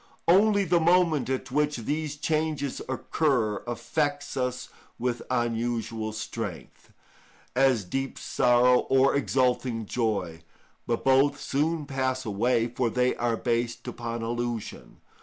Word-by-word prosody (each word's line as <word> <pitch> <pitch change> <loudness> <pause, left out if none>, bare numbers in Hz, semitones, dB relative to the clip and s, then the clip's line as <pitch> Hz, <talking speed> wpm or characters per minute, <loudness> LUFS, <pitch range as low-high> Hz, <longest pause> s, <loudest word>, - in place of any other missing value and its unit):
Only 200 +3 +5
the 175 -1 +2
moment 170 -4 +3
at 130 -1 -3
which 150 +1 +1
these 150 +5 -3
changes 155 -2 -1
occur 130 -6 0
affects 145 +4 -2
us 125 -1 -2 0.3
with 120 -1 -2
unusual 115 -2 -1
strength, 110 - -7 0.6
as 130 -6 +3
deep 135 +8 -3
sorrow 125 0 +3
or 135 +1 +4
exulting 125 -4 0
joy, 100 -8 -2 0.5
but 115 -1 -1
both 135 +2 +4
soon 155 +2 -1
pass 130 -1 -2
away, 115 +3 +1
for 120 0 -1
they 125 +2 +1
are 120 -1 0
based 120 0 -2
upon 115 -1 -4
illusion. 120 -1 -4
125 Hz, 120 wpm, -27 LUFS, 115-145 Hz, 0.6 s, Only